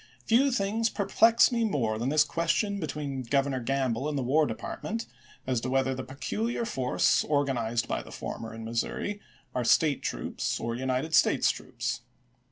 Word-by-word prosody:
Few 255 +5 +4
things 225 +1 +1
perplex 225 +4 +4
me 235 -1 +1
more 120 - 0
than 120 +3 0
this 150 +1 +5
question 170 +6 0
be 160 - -3
tween 140 -3 -4
Governor 135 +1 0
Gamble 130 +1 -1
and 150 - -2
the 135 - -1
War 150 +5 +3
Department, 220 - -4 0.4
as 125 -3 0
to 130 - -3
whether 135 0 +1
the 130 0 -5
peculiar 220 - -3
force 130 - +2
organized 125 -6 0
by - - -1
the - - -12
former 115 - -6
in 115 0 -8
Missouri 120 - -2 0.3
are 125 - -1
State 145 +4 +3
troops - - -2
or 115 0 -2
United 130 +5 -2
States - - +4
troops. - - -4
140 Hz, 170 wpm, -28 LUFS, 125-195 Hz, 0.4 s, this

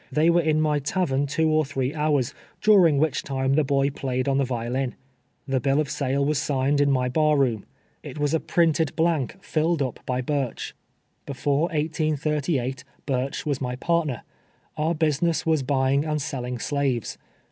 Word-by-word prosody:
They 160 +3 +3
were 170 0 +4
in 155 -1 +1
my 150 -1 +2
tavern 145 -2 0
two 160 +3 +1
or 155 0 +3
threa 135 -1 -2
houi 150 -2 +2
s, 120 - -8 0.3
during 185 -8 +5
which 155 -1 +1
time 135 0 -1
the 155 +2 +3
boy 140 0 +1
played 130 -1 -2
on 135 0 +2
the - - +3
vio 120 -2 -3
lin. 130 -1 -1 0.5
The 135 -1 +1
bill 135 +2 +1
of 150 -2 -1
sale 140 -1 0
was 150 -1 +1
signed 140 0 +1
in 145 - +3
my 130 -2 +2
bar 150 +3 +2
room. 120 -7 0 0.3
It - - -9
was 145 0 0
a 160 - +3
printed 160 -3 +1
hlank^ 165 0 0
filled 160 0 0
np 130 -4 -2
l>y 125 0 -3
Burch. 135 -2 -3 0.5
Before 140 +2 0
1838 150 -4 -1 0.2
Bnrch 135 0 -2
Avas 145 -3 -2
my 125 -1 -2
partner. 155 -3 -1 0.5
Our 155 +2 0
business 160 +1 +1
was 160 -3 +2
buying 135 +1 +1
and 155 -1 -1
selling 125 -4 -4
slaves. 135 -2 -2
145 Hz, 180 wpm, -24 LUFS, 130-155 Hz, 0.5 s, during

